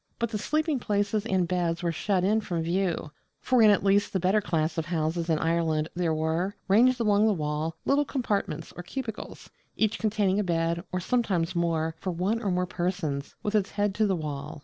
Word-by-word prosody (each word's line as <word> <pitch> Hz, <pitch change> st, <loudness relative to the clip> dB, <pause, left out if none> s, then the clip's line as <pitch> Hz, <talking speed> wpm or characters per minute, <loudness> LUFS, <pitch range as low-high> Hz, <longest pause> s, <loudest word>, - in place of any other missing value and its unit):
But 235 Hz, -1 st, -2 dB
the 210 Hz, -, -2 dB
sleeping 310 Hz, +3 st, 0 dB
places 205 Hz, 0 st, 0 dB
and 185 Hz, -4 st, +1 dB
beds 175 Hz, -1 st, -1 dB
were 170 Hz, -, +1 dB
shut 185 Hz, +3 st, 0 dB
in 215 Hz, +3 st, +2 dB
from 170 Hz, -5 st, -2 dB
view; 170 Hz, -3 st, -1 dB, 0.3 s
for 255 Hz, -2 st, +2 dB
in 215 Hz, -, +7 dB
at 205 Hz, -2 st, +3 dB
least 200 Hz, +1 st, +3 dB
the 190 Hz, -, +1 dB
better 190 Hz, +4 st, +2 dB
class 160 Hz, -3 st, -1 dB
of 160 Hz, -, -3 dB
houses 165 Hz, 0 st, -1 dB
in 160 Hz, -, +3 dB
Ireland 160 Hz, -1 st, 0 dB
there 175 Hz, -2 st, 0 dB
were, 160 Hz, +5 st, -1 dB
ranged 240 Hz, +6 st, +4 dB
along 210 Hz, -1 st, +3 dB
the 215 Hz, -, +3 dB
wall, 155 Hz, -1 st, -2 dB
little 285 Hz, +1 st, +3 dB
compartments 240 Hz, -8 st, -2 dB
or -, -, -6 dB
cubicles, 220 Hz, +4 st, -7 dB, 0.2 s
each 220 Hz, -1 st, 0 dB
containing 210 Hz, -3 st, +1 dB
a -, -, +1 dB
bed, 170 Hz, -1 st, 0 dB
or 185 Hz, -, -1 dB
sometimes 185 Hz, -6 st, 0 dB
more, 165 Hz, -2 st, 0 dB
for 190 Hz, -, -4 dB
one 185 Hz, +6 st, -1 dB
or 205 Hz, -, -1 dB
more 180 Hz, 0 st, +1 dB
persons, 175 Hz, -6 st, -3 dB
with 210 Hz, -, -2 dB
its 205 Hz, -2 st, +2 dB
head 205 Hz, -1 st, 0 dB
to 215 Hz, +2 st, +2 dB
the 190 Hz, -, +1 dB
wall. 150 Hz, -2 st, -5 dB
185 Hz, 205 wpm, -27 LUFS, 165-210 Hz, 0.3 s, in